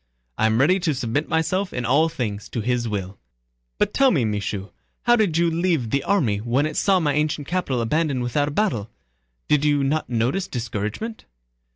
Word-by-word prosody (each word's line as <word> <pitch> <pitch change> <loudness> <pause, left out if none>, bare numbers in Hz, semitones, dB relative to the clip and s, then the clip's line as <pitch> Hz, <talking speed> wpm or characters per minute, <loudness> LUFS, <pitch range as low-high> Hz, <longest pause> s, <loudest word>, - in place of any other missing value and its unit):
I 110 - +4
am 110 +1 +1
ready 180 +8 +4
to 165 -5 0
submit 130 +4 -2
myself 185 +4 0
in 125 -1 -3
all 150 +6 +3
things 110 -10 -4
to 115 - -3
His 120 0 -1
will; 100 -2 -4 0.6
but - - +1
tell 275 -1 +5
me, 140 - +2
Michaud, 100 -1 -3 0.3
how 240 0 +5
did 205 -8 +1
you 170 0 +2
leave 165 -9 0
the 140 - +1
army 125 - +1
when 120 +6 +1
it 155 - -3
saw 195 -2 +3
my 150 -4 +1
ancient 150 -1 -1
capital 165 -9 -1
abandoned 140 +1 0
without 145 +4 0
a - - -1
battle? 145 - -1 0.6
Did 150 -1 +3
you 145 -2 +2
not 150 +3 0
notice 125 +11 0
discouragement?..." 115 - -4
140 Hz, 190 wpm, -23 LUFS, 115-165 Hz, 0.6 s, tell